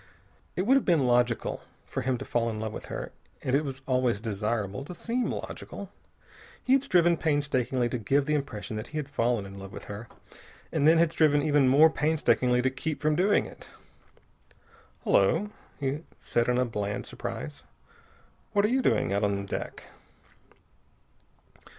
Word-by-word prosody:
It 185 - 0
would 245 +7 +4
have 275 - +1
been 165 -7 +3
logical 120 -1 +1 0.2
for - - -4
him 130 0 0
to - - -7
fall 115 -1 0
in 110 -1 -4
love 110 0 -4
with - - -7
her, - - -6 0.3
and 130 - +1
it 145 - +2
is 135 -2 -5
always 125 -4 +1
desirable 110 +1 -2
to 180 - -8
seem 240 +6 -1
logical. - - -7 0.7
He 255 - +3
had 270 - +5
striven 175 -9 +4
painstakingly 135 -5 +1
to 125 - -2
give 135 +6 +2
the 150 - 0
impression 115 -7 -3
that 110 +2 -5
he 155 - -6
had 150 -2 -2
fallen 120 -6 0
in 100 0 -9
love 95 0 -9
with - - -8
her 105 +3 -8 0.6
and 150 -2 +2
then 165 +1 +7
had 165 -1 +4
striven 145 -3 +3
even 145 -3 +4
more 155 +4 +7
painstakingly 130 -6 +2
to 130 - +2
keep 145 +3 -3
from 155 0 +2
doing 195 +5 +3
it. - - -12 1.4
"Hullo," 195 - +3 0.3
he 140 +1 -1 0.2
said 120 +1 0
in 125 0 +2
bland 105 -2 -3
surprise. 70 +1 -6 0.9
"What 205 0 +4
are - - +2
you 260 +2 +2
doing 95 - +2
out 100 +1 +1
on 100 -1 0
deck?" - - -5
130 Hz, 170 wpm, -28 LUFS, 110-155 Hz, 1.4 s, then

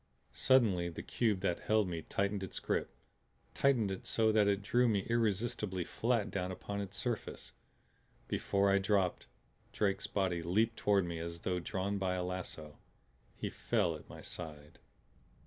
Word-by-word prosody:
Suddenly 95 - +3
the 85 - -7
cube 110 -6 0
that 90 -3 0
held 110 -2 +2
me 85 -2 -3
tightened 100 +4 -1
its 95 - -5
grip; - - -1 0.6
tightened 120 -8 +3
it 95 - -5
so 110 -1 +3
that 105 -1 +4
it 100 0 +1
drew 120 +4 +3
me 105 -4 +2
irresistibly 105 -4 0
flat 115 +3 0
down 90 -1 -2
upon 100 +2 -4
its 100 -1 -6
surface. 120 -1 -3 0.8
Before 100 0 +2
I 100 - +4
dropped, 95 - +1 0.4
Drake's 100 -2 0
body 90 -4 0
leaped 110 +7 +2
toward 100 -3 +2
me 85 -1 -4
as 85 0 -5
though 90 -1 -1
drawn 100 +3 -2
by 95 -1 0
a 90 - -1
lasso. 90 -4 -6 0.6
He - - -4
fell 100 -8 +1
at 75 - -12
my - - -9
side. 75 -2 -8
100 Hz, 160 wpm, -34 LUFS, 90-105 Hz, 0.8 s, that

